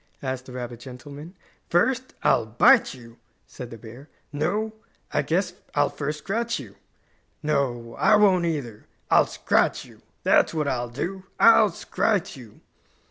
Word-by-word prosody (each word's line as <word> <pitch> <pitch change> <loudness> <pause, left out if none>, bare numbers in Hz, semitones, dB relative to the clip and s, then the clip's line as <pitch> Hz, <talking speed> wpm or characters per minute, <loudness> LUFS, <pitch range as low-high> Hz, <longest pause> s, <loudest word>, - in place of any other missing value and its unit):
asked 130 -1 -4
the - - -10
rabbit 120 -2 -6
gentleman. 145 +7 -11 0.3
"First, 255 +9 +1
I'll 135 -6 +3
bite 220 - +4
you," 115 -2 -15 0.3
said 125 -2 -9
the 115 - -9
bear. 120 +7 -13 0.2
"No, 205 +9 -1 0.4
I - - +2
guess 180 +2 -1 0.2
I'll 145 0 +2
first 150 +1 -4
scratch 230 +8 -2
you. - - -10 0.7
No, 130 -6 -1
I 215 - +5
won't 190 -4 +4
either. 135 -10 -4 0.2
I'll - - +5
scrite - - 0
you; - - -18 0.2
that's - - +3
what 150 -2 -1
I'll 120 -3 -2
do. 185 +10 -5
I'll 225 -2 +7
scrite 195 +2 -1
you!" 115 -5 -14
145 Hz, 145 wpm, -24 LUFS, 125-190 Hz, 0.7 s, I'll